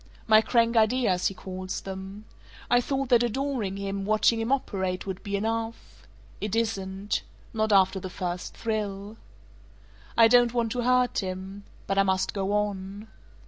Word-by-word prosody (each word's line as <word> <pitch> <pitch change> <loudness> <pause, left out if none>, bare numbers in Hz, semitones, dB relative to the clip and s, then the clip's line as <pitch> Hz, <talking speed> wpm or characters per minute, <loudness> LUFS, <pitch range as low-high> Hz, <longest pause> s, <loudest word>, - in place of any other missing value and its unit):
My 215 -1 +6
'crank 230 0 +2
ideas;' 220 -4 +3
he 195 - -4
calls 185 0 -6
them. 195 +2 -8 0.5
I 245 0 +5
thought 270 0 -2
that 240 -2 +5
adoring 240 -4 -1
him, 195 0 -3
watching 215 +2 +3
him 225 +3 -2
operate, 190 -9 -1
would 190 -1 -5
be 200 -2 -3
enough. 225 +2 -4 0.3
It 210 0 -2
isn't. 200 -3 -1 0.3
Not 220 -1 0
after 190 -1 +4
the 185 - -6
first 180 0 -5
thrill. 210 -1 -3 1.0
"I 230 -1 +8
don't 245 0 +4
want 230 -2 0
to 245 - -1
hurt 250 0 +2
him. 190 +1 -6 0.2
But 195 0 0
I - - +6
must 190 -1 0
go 195 -1 -2
on. 205 0 -2
210 Hz, 155 wpm, -27 LUFS, 190-230 Hz, 1.0 s, I